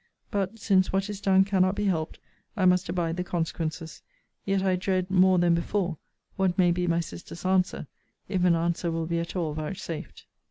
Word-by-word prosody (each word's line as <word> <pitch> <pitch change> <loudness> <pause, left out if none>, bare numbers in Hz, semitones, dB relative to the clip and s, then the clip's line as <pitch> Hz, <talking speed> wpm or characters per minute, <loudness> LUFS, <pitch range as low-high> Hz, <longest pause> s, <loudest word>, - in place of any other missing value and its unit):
But, 200 +2 -1
since 190 -4 +2
what 195 +2 0
is 205 -1 -7
done 190 -1 +4
cannot 190 -1 +2
be 210 0 -1
helped, 165 -5 -1 0.4
I 190 - +2
must 180 -1 +3
abide 170 -1 -1
the 180 - -1
consequences: 165 -1 -4 0.4
yet 195 -1 +1
I 190 -1 +2
dread 185 0 -1
more 185 0 +5
than 175 -1 +4
before, 175 -1 -1 0.4
what 190 -2 +1
may 180 -2 +4
be 180 +1 0
my 170 0 +2
sister's 160 - -9
answer, 185 -3 +1 0.4
if 185 -2 -1
an 175 -2 +5
answer 170 +1 -1
will 165 0 -2
be 170 +1 -1
at 170 +2 -5
all 165 -4 -1
vouchsafed. 160 +1 -6
180 Hz, 190 wpm, -27 LUFS, 170-190 Hz, 0.4 s, more